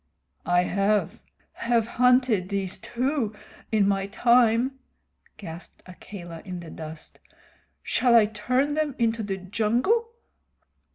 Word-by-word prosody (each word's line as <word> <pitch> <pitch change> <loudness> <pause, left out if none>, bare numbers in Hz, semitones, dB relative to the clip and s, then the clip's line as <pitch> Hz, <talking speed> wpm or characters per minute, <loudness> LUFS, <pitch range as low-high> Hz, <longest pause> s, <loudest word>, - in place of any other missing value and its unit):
"I 175 0 +3
have 200 +3 0 0.3
have 235 -1 0
hunted 250 -5 +2
these 195 -2 -2
too 245 -1 -2 0.4
in 210 -3 +3
my 195 -1 0
time," 240 +4 +3 0.6
gasped 170 -2 -10
Akela 175 -2 -10
in 180 -2 -6
the 170 -2 -10
dust. 160 0 -10 0.6
"Shall 245 -2 +3
I 225 -2 +7
turn 250 +7 0
them 300 -3 -1
into 230 -1 +1
the 200 -2 -3
jungle?" 235 - 0
215 Hz, 115 wpm, -25 LUFS, 190-250 Hz, 0.6 s, I